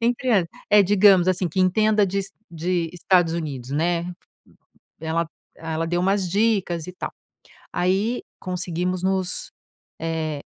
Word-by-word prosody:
entre 245 +2 0
hã, 195 -5 +4 0.3
é, 210 -1 +7
digamos 190 -2 +5
assim, 185 -1 +1
que 185 +4 -1
entenda 210 +3 +3
de 195 +2 -2
Es 195 0 -3 0.2
de 170 0 -1
Estados 175 -1 +2
Unidos, 135 -6 -4
né. 170 +4 0 0.9
Ela 160 +1 -1 0.3
ela 165 0 -3
deu 175 +1 0
umas 195 -1 +1
dicas 195 -5 +1
e 180 - -8
tal. - - -5 0.6
Aí 195 +7 +1 0.2
conseguimos 180 0 -2
nos, 190 -1 -1 0.5
eh, 160 -2 -2
180 Hz, 135 wpm, -23 LUFS, 165-195 Hz, 0.9 s, é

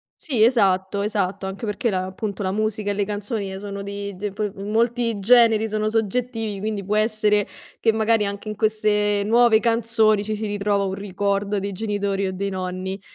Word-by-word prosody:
sì, 245 -9 +1
esatto, 200 -4 +2
esatto, 200 -2 -1
anche 195 +4 -5
perché 215 +3 -1
la 185 -2 -1
appunto, 200 +1 -5
la 185 - 0
musica 215 0 -1
e - - 0
le 200 0 -1
canzoni 205 -1 -3
e 190 - -6
sono 200 0 -6
di 200 0 -6
di 205 +2 -4
poi 210 0 -3
molti 230 +3 0
generi 225 0 +5
sono 215 0 -1
soggettivi, 225 -1 -1
quindi 210 -1 -3
può 210 +1 -1
essere 215 -1 +2 0.3
che 225 - +3
magari 220 -1 +2
anche 200 +1 -6
in 215 - -4
queste 210 -1 +1
nuove 230 0 +5
canzoni 225 -2 +2
ci 215 +1 -3
si 215 +1 -4
ritrova 205 -1 0
un 190 -1 -2
ricordo 200 +1 -1
dei 200 +1 -3
genitori 200 -1 -2
o - - -2
dei 200 +1 -3
nonni. 185 +1 -4
205 Hz, 185 wpm, -22 LUFS, 200-220 Hz, 0.3 s, generi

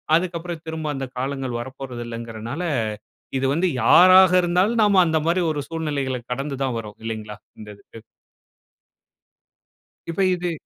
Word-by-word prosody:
அதுக்கப்புறம் 170 -1 -2
திரும்ப 160 -1 -4
அந்த 135 - -3
காலங்கள் 130 -1 -3
வரப்போறது 130 -1 -7
இல்லங்கறனால, 115 +5 -6 0.8
இது 135 - -1
வந்து 170 +5 +1 0.2
யாராக 185 +5 +7
இருந்தாலும், 185 +7 +1
நாம 200 -3 +5
அந்த 160 -1 +1
மாரி 175 +2 +2
ஒரு 150 -2 -3
சூழ்நிலைகள 145 -6 -2
கடந்து 135 +1 -4
தான் 130 -3 -1
வர்றோம் 105 -2 -10
இல்லைங்களா, 110 -2 -5 0.2
இந்த 105 - -10
இதுக்கு. 115 - -15 2.1
இப்ப 170 +4 -2
இது 175 0 -3
145 Hz, 130 wpm, -22 LUFS, 125-175 Hz, 2.1 s, யாராக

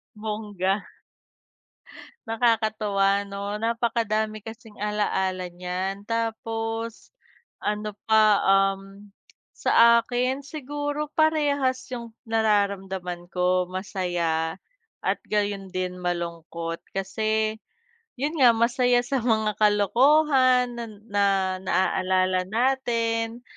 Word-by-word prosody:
Bongga. 210 -2 -2 1.4
Nakakatuwa 215 -4 +1
no 200 +1 -5
napakadami 220 -1 -1
kasing 225 -1 -11
alaala 190 -3 -1
niyan. 180 +3 -4
Tapos 225 - -3 0.5
ano 210 0 -2
pa, 215 -2 +4
um, 195 +1 +1 0.5
sa 235 0 +5
akin 255 +3 -1
siguro 290 +1 -4
parehas 290 -4 +1
yung 235 -2 -6 0.2
nararamdaman 195 -5 -1
ko, 180 0 +1
masaya 175 -3 -2 0.4
at - - -1
gayon 205 -2 -2
din 185 -1 -3
malungkot. 170 -1 -4
Kasi 215 +3 -1 0.6
yun 290 +5 -3
nga 245 -3 +6
masaya 245 +1 +3
sa 270 +2 -1
mga 220 -3 0
kalokohan 255 - +4
nan 215 -3 -8
na 195 -2 +1
naaalala 185 0 +1
natin. 230 0 0
215 Hz, 85 wpm, -25 LUFS, 190-235 Hz, 1.4 s, nga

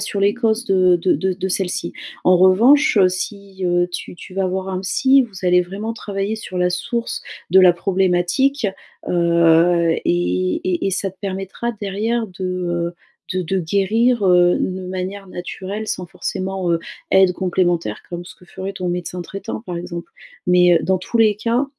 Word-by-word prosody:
sur 200 - -3
les 200 +1 +4
causes 225 -1 0
de 185 -5 +4
de 180 +2 +1
de 185 +5 0
de 190 0 -3
celle-ci. 185 -1 -2 0.3
En 180 0 +5
revanche, 230 - +5
heu, 185 -2 +6
si, 195 +1 -6
heu, 175 0 +2
tu - - -6
tu 185 - -12
vas 195 0 -1
avoir 190 +1 -2
un 185 0 -2
psy, 265 +8 +3
vous 195 -7 -4
allez 180 0 +5
vraiment 200 +5 -4
travailler 200 -1 -3
sur 205 -4 -7
la 180 0 +2
source 235 +6 -3 0.3
de 190 +2 +7
la 180 -2 +6
problématique, 190 +8 +1 0.4
heu 170 0 +3
et 90 +1 0
et 185 +1 0
et - - +1
ça 195 +1 -1
te 190 - -26
permettra 195 +4 -4
derrière 215 +3 -2
de, 190 -1 -10
heu, 175 -1 -2 0.4
de 185 - -1
de 190 +3 -1
guérir, 205 +7 +1
heu, 180 -1 +5
une 185 0 -3
manière 190 +2 -5
naturelle 190 +4 -6
sans 180 - -3
forcément, 185 +1 -3
heu, 170 - +2 0.3
aide 190 -1 +5
complémentaire 175 - -1
comme 175 0 -5
ce - - -11
que 180 - -20
ferait 190 +2 -7
ton 180 -1 -3
médecin 175 0 -4
traitant, 195 +4 -6
par 180 -6 -6
exemple. 170 -1 -7 0.4
Mais, 180 -1 +5
heu, - - +5
dans 190 -1 +1
tous 185 +6 -4
les 215 -2 +5
cas, 235 +5 0
185 Hz, 180 wpm, -20 LUFS, 175-200 Hz, 0.4 s, de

